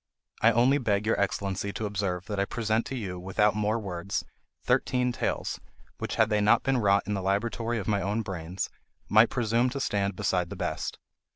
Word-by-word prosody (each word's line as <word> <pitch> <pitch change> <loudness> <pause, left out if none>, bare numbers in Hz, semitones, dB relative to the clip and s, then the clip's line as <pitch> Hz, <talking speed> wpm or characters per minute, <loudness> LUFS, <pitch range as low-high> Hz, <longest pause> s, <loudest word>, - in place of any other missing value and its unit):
I 115 - +6
only 125 +5 +4
beg 105 -4 0
your 110 - +1
Excellency 100 0 -1
to 110 - -3
observe 95 -3 -2
that 105 -2 -3
I 100 - +2
present 110 +1 -1
to 135 - -4
you, 95 -7 -4
without 100 +3 +2
more 105 +1 +1
words, 95 -3 -3 0.4
thirteen 125 -1 +2
tales, - - -2 0.4
which, - - -3
had 110 0 +3
they 105 0 +3
not 105 +3 +4
been 135 -2 +2
wrought 100 -2 +3
in 105 - -2
the 100 - -1
laboratory 115 +4 -1
of 105 - -4
my 100 -2 +1
own 105 +4 -1
brains, 90 -2 -4 0.4
might 110 +2 +6
presume 120 +1 +1
to 140 +2 -4
stand 100 -6 0
beside 90 -1 0
the - - -6
best. - - -3
105 Hz, 195 wpm, -28 LUFS, 100-115 Hz, 0.4 s, I